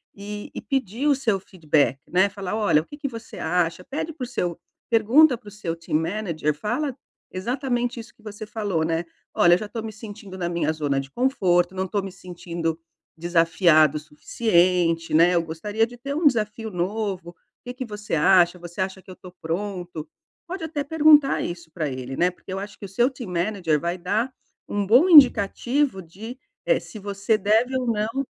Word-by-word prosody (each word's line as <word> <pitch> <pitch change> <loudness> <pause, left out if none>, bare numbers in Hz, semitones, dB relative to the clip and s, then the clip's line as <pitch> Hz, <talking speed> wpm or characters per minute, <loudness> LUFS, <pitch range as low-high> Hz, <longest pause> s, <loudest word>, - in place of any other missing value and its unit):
e 205 +1 -7
e - - -5
pedir 265 0 -2
o 290 - +5
seu 225 -7 0
feedback, 150 - 0
né, 185 +3 +3
falar: 200 0 -5
"Olha, 205 -8 +3
o - - -15
que 290 - -11
que 285 - -3
você 230 -2 -10
acha?". 175 +1 0
Pede 295 - -4
para 295 - -7
o - - -9
seu 175 -8 -3 0.3
pergunta 240 +5 +5
para 210 -3 -13
o - - -15
seu 190 -5 -4
team 165 -2 -1
manager, 165 -4 -1
fala 245 - -2 0.4
exatamente 245 +4 -2
isso 225 - -11
que 220 - -25
você 210 0 -8
falou, 205 -6 -2
né. 165 +1 -1 0.3
"Olha, 175 0 +5
eu - - +1
já 215 - -5
tô 225 0 -5
me 220 - -5
sentindo 205 -3 -10
na 175 - -2
minha 170 -2 0
zona 145 -3 -1
de 135 0 -12
conforto, 185 - +1
não 190 0 -2
tô 200 +2 -1
me 195 -1 -7
sentindo 170 -3 -5 0.4
desafiado 165 -2 +4
o - - -3
suficiente, 170 +1 +1
né, 170 +3 +5
eu 170 - +2
gostaria 205 +8 -1
de 245 - -13
ter 280 +3 -5
um 310 0 +3
desafio 220 -3 0
novo, 185 -1 -3 0.3
que 245 - -5
que 255 0 -5
você 210 -2 -7
acha? 175 +2 +4
Você 175 +1 -10
acha 190 0 -3
que 185 - -13
eu - - -10
tô 180 - -12
pronto?". 175 -2 -4 0.4
Pode 360 0 -5
até 310 -3 -3
perguntar 300 -1 +5
isso 170 -2 -6
para 155 -3 -2
ele, 130 0 -6
né, 175 - +3
porque 185 - -10
eu 190 - -3
acho 205 +1 -8
que - - -7
o - - -9
seu 240 +2 +4
team 250 -8 -8
manager 175 -3 0
vai 170 +3 -2
dar 220 +8 -1 0.4
um 205 -1 -1
bom 255 - +6
indicativo 260 - +5
de, 215 +10 -9 0.3
eh, - - +3
se 215 - -11
você 200 +2 0
deve 220 +6 +2
ou 255 -1 -2
não 225 +4 -1
200 Hz, 200 wpm, -24 LUFS, 170-235 Hz, 0.4 s, bom